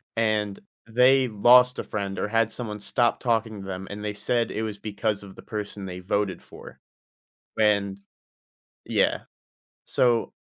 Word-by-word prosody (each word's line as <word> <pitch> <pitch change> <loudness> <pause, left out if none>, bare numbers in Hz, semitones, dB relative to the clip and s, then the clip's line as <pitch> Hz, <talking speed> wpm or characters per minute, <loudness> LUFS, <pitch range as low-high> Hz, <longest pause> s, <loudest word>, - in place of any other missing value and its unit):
and 110 -3 0 0.3
they 125 +3 +4
lost 125 +3 +5
a - - -2
friend 100 -2 -4
or - - -1
had 115 +1 +1
someone 110 -3 -5
stop 120 +3 +1
talking 115 -3 -1
to 95 - -9
them. 95 0 -5
And 105 +1 -7
they 105 - -2
said 115 +3 0
it 110 - -3
was 105 -2 -5
because 105 0 -2
of 95 -1 -12
the - - -11
person 105 -2 -5
they 90 -1 -6
voted 100 +1 -1
for. - - -13 0.8
And 100 -2 +2 0.8
yeah. - - +1 0.6
So, 120 -2 +2
105 Hz, 155 wpm, -25 LUFS, 100-115 Hz, 0.8 s, lost